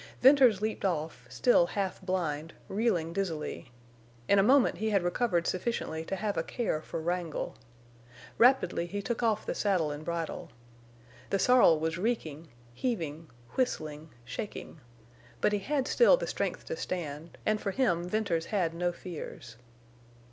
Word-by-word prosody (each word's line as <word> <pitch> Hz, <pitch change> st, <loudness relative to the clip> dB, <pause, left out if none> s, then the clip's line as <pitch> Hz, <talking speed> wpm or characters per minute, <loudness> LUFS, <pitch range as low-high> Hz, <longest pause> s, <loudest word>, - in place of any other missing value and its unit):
Venters 255 Hz, -6 st, +6 dB
leaped 220 Hz, 0 st, -2 dB
off, 155 Hz, -9 st, -2 dB
still 170 Hz, -, +4 dB
half 195 Hz, -1 st, -3 dB
blind, 165 Hz, -4 st, -2 dB
reeling 190 Hz, -6 st, 0 dB
dizzily. 165 Hz, -10 st, -3 dB, 0.6 s
In 200 Hz, -, +5 dB
a -, -, +7 dB
moment 260 Hz, +6 st, +4 dB
he 220 Hz, +1 st, 0 dB
had 200 Hz, -4 st, +2 dB
recovered 175 Hz, -1 st, +1 dB
sufficiently 185 Hz, -5 st, -2 dB
to 195 Hz, -, -2 dB
have 205 Hz, +1 st, -2 dB
a -, -, +2 dB
care 220 Hz, -9 st, -2 dB
for 160 Hz, -, -5 dB
Wrangle. 170 Hz, -1 st, -3 dB, 0.8 s
Rapidly 230 Hz, -9 st, +4 dB
he 200 Hz, +3 st, -4 dB
took 235 Hz, +2 st, -2 dB
off 220 Hz, -3 st, +1 dB
the -, -, -2 dB
saddle 180 Hz, -7 st, +1 dB
and 145 Hz, +1 st, -6 dB
bridle. 170 Hz, 0 st, -4 dB, 0.8 s
The 195 Hz, -, +2 dB
sorrel 240 Hz, -8 st, +5 dB
was 160 Hz, +2 st, -2 dB
reeking, 165 Hz, -8 st, -2 dB, 0.3 s
heaving, 165 Hz, -, -3 dB, 0.3 s
whistling, 155 Hz, -, -2 dB, 0.2 s
shaking. 155 Hz, -, -7 dB, 0.6 s
But 210 Hz, -, +2 dB
he 205 Hz, -, +1 dB
had 275 Hz, +5 st, -1 dB
still -, -, +6 dB
the -, -, -3 dB
strength -, -, -3 dB
to 485 Hz, -, -3 dB
stand, 165 Hz, -, -5 dB
and 215 Hz, 0 st, +1 dB
for 200 Hz, -, -1 dB
him 180 Hz, -6 st, +1 dB
Venters 180 Hz, -6 st, 0 dB
had 180 Hz, -6 st, 0 dB
no 175 Hz, +1 st, 0 dB
fears. 160 Hz, -8 st, -8 dB
180 Hz, 150 wpm, -30 LUFS, 160-220 Hz, 0.8 s, a